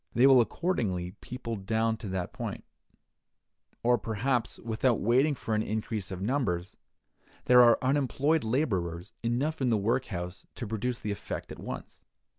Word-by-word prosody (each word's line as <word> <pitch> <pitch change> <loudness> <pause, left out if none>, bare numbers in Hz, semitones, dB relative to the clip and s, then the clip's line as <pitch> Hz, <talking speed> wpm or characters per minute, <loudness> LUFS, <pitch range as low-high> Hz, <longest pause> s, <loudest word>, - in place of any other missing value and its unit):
They 125 - +6
will 135 -2 +8
accordingly 110 - -1
people 125 -2 -5
down 110 +3 0
to 105 - -7
that 95 -2 -3
point; - - -5 1.2
or, 120 0 +4
perhaps, 115 +4 -1
without 115 +1 +1
waiting 130 +7 +3
for 115 - -3
an 110 - +2
increase 110 -2 -3
of 95 0 -5
numbers, 100 -8 -1 0.7
there 125 0 +8
are 120 -1 +7
unemployed 140 +3 +2
laborers 95 - -1
enough 135 +7 -1
in 130 - +2
the 115 - +3
workhouse 100 -4 -2
to - - -5
produce 115 +3 -2
the 105 - -2
effect 100 - -5
at - - -8
once. - - -7
115 Hz, 150 wpm, -29 LUFS, 100-130 Hz, 1.2 s, will